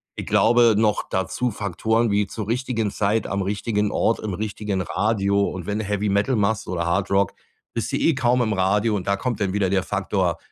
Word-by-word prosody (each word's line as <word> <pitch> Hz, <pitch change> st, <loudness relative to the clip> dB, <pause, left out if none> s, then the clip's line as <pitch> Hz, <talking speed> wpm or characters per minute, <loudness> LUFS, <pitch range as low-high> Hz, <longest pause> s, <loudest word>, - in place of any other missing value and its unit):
ich -, -, -6 dB
glaube, 120 Hz, -1 st, +4 dB
noch 105 Hz, -1 st, +2 dB
dazu 105 Hz, +6 st, -1 dB
Faktoren 110 Hz, +3 st, 0 dB
wie 100 Hz, 0 st, +1 dB
zur 105 Hz, +1 st, -6 dB
richtigen 115 Hz, -3 st, -1 dB
Zeit 105 Hz, +3 st, 0 dB
am 100 Hz, +1 st, -2 dB
richtigen 105 Hz, +1 st, -1 dB
Ort 115 Hz, -, +1 dB
im 105 Hz, -3 st, -4 dB
richtigen 105 Hz, -1 st, -3 dB
Radio 100 Hz, 0 st, 0 dB
und 90 Hz, -2 st, -7 dB
wenn 105 Hz, +1 st, -1 dB
du 110 Hz, -, -3 dB
Heavy 105 Hz, +1 st, -1 dB
Metal 100 Hz, +6 st, +1 dB
machst 105 Hz, 0 st, 0 dB
oder 85 Hz, -2 st, -2 dB
Hard 95 Hz, +3 st, 0 dB
Rock, 100 Hz, -2 st, +2 dB, 0.4 s
bist -, -, -3 dB
du -, -, +2 dB
eh 165 Hz, -, +2 dB
kaum 125 Hz, -1 st, +2 dB
im 110 Hz, -3 st, 0 dB
Radio 105 Hz, +3 st, +1 dB
und 95 Hz, -2 st, -4 dB
da 100 Hz, -, +2 dB
kommt 120 Hz, -1 st, -3 dB
dann 95 Hz, -2 st, 0 dB
wieder 100 Hz, -2 st, +1 dB
der 95 Hz, -1 st, +1 dB
Faktor 95 Hz, -3 st, -1 dB
105 Hz, 210 wpm, -23 LUFS, 100-110 Hz, 0.4 s, glaube